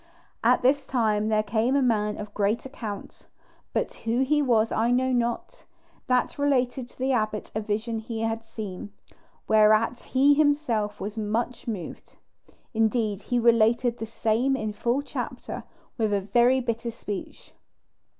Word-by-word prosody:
At - - +4
this 270 +2 +3
time 215 -4 +1
there 215 -1 +2
came 220 +5 +1
a 280 - +3
man 210 -4 +1
of 210 0 -7
great 210 +4 0
account, 220 -7 -8 0.4
but - - -1
who 230 +3 -1
he 295 +3 +2
was 230 -5 +2
I 230 +2 +1
know 255 +1 +2
not, 240 -1 -2 0.4
that 250 +2 +1
related 255 -3 +1
to - - -23
the 260 +1 0
abbot 215 -4 -1
a 215 - -1
vision 220 +2 -2
he 225 0 -5
had 225 0 -2
seen, 210 -3 -7 0.6
whereat 215 +2 +4
he 275 +2 +3
himself 285 -9 +1
was 210 +3 -5
much 225 +4 -2
moved. 205 -7 -6 0.6
Indeed, 220 -2 +1
he 245 - -1
related 235 +1 +3
the 225 - -4
same 230 +4 +1
in 215 -4 -3
full 240 +6 0
chapter, - - -6 0.3
with 215 -2 +1
a 200 - +2
very 240 +6 +3
bitter 235 -1 -2
speech. 210 -4 -7
230 Hz, 150 wpm, -26 LUFS, 215-250 Hz, 0.6 s, At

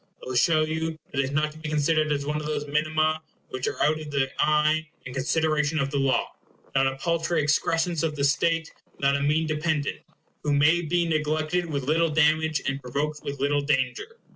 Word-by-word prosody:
It - - -9
will 130 - -4
show 155 +6 +4
you 160 +1 -2
that 135 - -3
it - - +4
is 130 - -3
not 155 +2 0
to 155 - -14
be 155 -1 -5
considered 155 +1 +1
as 140 -1 -1
one 150 +1 -1
of 150 0 -4
those 150 -1 -2
minima 155 +1 +1 0.3
which 130 0 -3
are - - -3
out 155 +1 +2
of 155 -1 -7
the 135 -2 0
eye 155 +1 +2 0.2
and 125 - -7
consideration 155 +3 +1
of 140 -2 0
the 140 - 0
law; 135 -1 +1 0.4
not 135 0 +3
a 135 - -2
paltry 170 +3 0
excrescence 165 +3 +1
of 160 -2 -1
the 140 - -2
state; 165 +3 +1 0.2
not 140 0 +2
a 140 - -1
mean 150 +3 +2
dependent, 155 -1 -1 0.4
who 150 - 0
may 150 +4 +4
be 170 +1 0
neglected 155 +2 0
with 140 -4 -3
little 160 +4 +2
damage 155 0 +2
and 135 +1 -2
provoked 145 +4 -3
with 140 -1 -5
little 145 +1 +1
danger. 140 - -1
150 Hz, 210 wpm, -26 LUFS, 140-160 Hz, 0.4 s, show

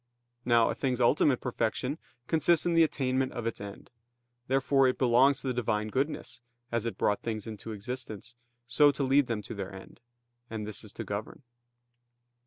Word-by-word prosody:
Now 120 -2 +4
a - - -1
thing's 130 -2 -1
ultimate 125 +1 +3
perfection 125 +4 -2 0.3
consists 165 +1 +3
in 175 - +2
the 165 - +5
attainment 130 -4 +1
of 120 -2 -5
its 115 -3 -3
end. 100 0 -9 0.6
Therefore 135 0 +3
it 125 - 0
belongs 130 +2 +4
to - - -5
the - - 0
Divine 110 -3 -1
goodness, 135 +1 -2 0.3
as 115 -1 -1
it 115 - -4
brought 105 - +1
things 110 -2 -4
into 110 0 -7
existence, 120 0 -6 0.3
so 145 +5 +5
to 140 - -2
lead 135 0 +4
them 110 -3 -2
to - - -7
their 100 -3 -5
end: 95 +4 -12 0.5
and 110 -2 -4
this 105 -1 -4
is 105 - -8
to - - -5
govern. 105 +7 -6
120 Hz, 180 wpm, -29 LUFS, 110-135 Hz, 0.6 s, the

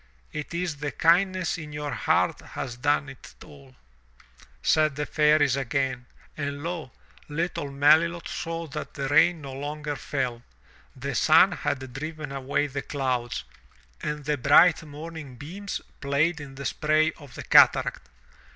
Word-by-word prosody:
"It 150 -1 -5
is 170 -3 -2
the 145 0 -3
kindness 180 +1 +2
in 150 -2 -8
your 150 -1 -4
heart - - +1
has 120 - -6
done 145 +3 +1
it 135 -1 -12
all," 140 -3 -16 0.9
said 155 -2 +3
the 150 +1 -2
Fairies 150 -3 +3
again. 130 -1 -2 0.3
And 145 -1 -4
lo! 170 -4 -4 0.4
little 155 -1 -2
Melilot 155 +5 +3
saw 165 0 -4
that 150 +2 -7
the 140 -2 -2
rain 160 +3 +4
no 135 -2 -7
longer 145 +2 -4
fell. 125 -4 -3 0.5
The - - -4
sun - - +5
had 130 -2 -3
driven 155 +1 -6
away 140 +1 -1
the 140 -1 -4
clouds, 130 -5 -2 0.6
and 150 -1 -4
the 150 +1 0
bright 150 +6 +6
morning 155 -2 -9
beams 185 +10 -6 0.2
played 145 +4 +1
in 135 -2 -10
the 140 +1 -7
spray 155 +2 +2
of 140 -5 -13
the - - -7
cataract. 65 - +4
145 Hz, 145 wpm, -26 LUFS, 140-160 Hz, 0.9 s, bright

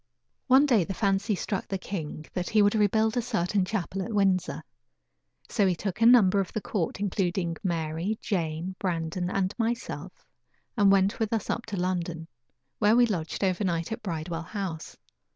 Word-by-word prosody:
One 265 +2 +6
day 235 -10 +4
the 195 +3 -5
fancy 200 0 +1
struck 195 +1 -3
the 195 - -2
king 160 -5 -6
that 180 -1 -2
he 215 -1 +4
would 205 - +4
rebuild 220 +1 +2
a 245 - +2
certain 205 -4 0
chapel 195 -1 -3
at 220 - -4
Windsor; 195 -3 +1 0.8
so 205 -4 +2
he 180 - +2
took 195 +4 -4
a 230 - +7
number 205 -5 +6
of 195 - -2
the - - -1
court, 195 -4 -3
including 180 -4 -1
Mary, 170 +3 -1
Jane, 170 -1 -2
Brandon 175 -1 -2
and 195 0 0
myself, 235 +1 -3 0.5
and 205 -4 +5
went 195 +2 +3
with 220 -2 0
us 225 -3 -1
up 235 - -4
to 205 -3 -4
London, 175 -3 -2 0.5
where 210 +1 +4
we 245 0 +6
lodged 175 -5 -3
over 190 +1 +1
night 170 -2 -1
at 220 - -4
Bridewell 165 -2 -4
House. 170 -2 -5
195 Hz, 175 wpm, -27 LUFS, 175-215 Hz, 0.8 s, a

